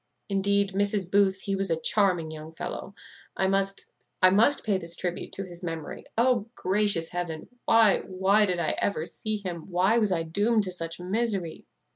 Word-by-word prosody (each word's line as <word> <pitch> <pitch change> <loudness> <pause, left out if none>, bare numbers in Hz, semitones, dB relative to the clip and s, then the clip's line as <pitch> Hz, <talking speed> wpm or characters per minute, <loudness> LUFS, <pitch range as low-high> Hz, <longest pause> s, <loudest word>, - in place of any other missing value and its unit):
Indeed, 200 0 +1
Mrs. 200 -2 0
Booth, 195 -1 +3
he 195 0 -2
was 195 -1 +3
a 165 -1 0
charming 175 -2 +1
young 155 0 -9
fellow; 180 +4 -6 0.4
I 190 - +1
must 195 +1 0 0.3
I 185 - +6
must 225 +9 +4
pay 200 -4 +1
this 170 -1 -4
tribute 175 0 -4
to 195 - -5
his 175 -2 -10
memory. 165 -3 -6
O, 235 -2 +2
gracious 190 -3 +2
Heaven! 175 -3 -5 0.2
why, 225 -3 +5
why 195 +3 +2
did 180 -2 -1
I 170 -2 0
ever 165 -6 -1
see 215 +4 -4
him? 180 -4 -7
why 190 +6 +3
was 210 -3 +2
I 165 -2 0
doomed 205 +7 +1
to 185 - -3
such 165 -1 -4
misery?" 195 -2 -2
190 Hz, 180 wpm, -27 LUFS, 175-205 Hz, 0.4 s, I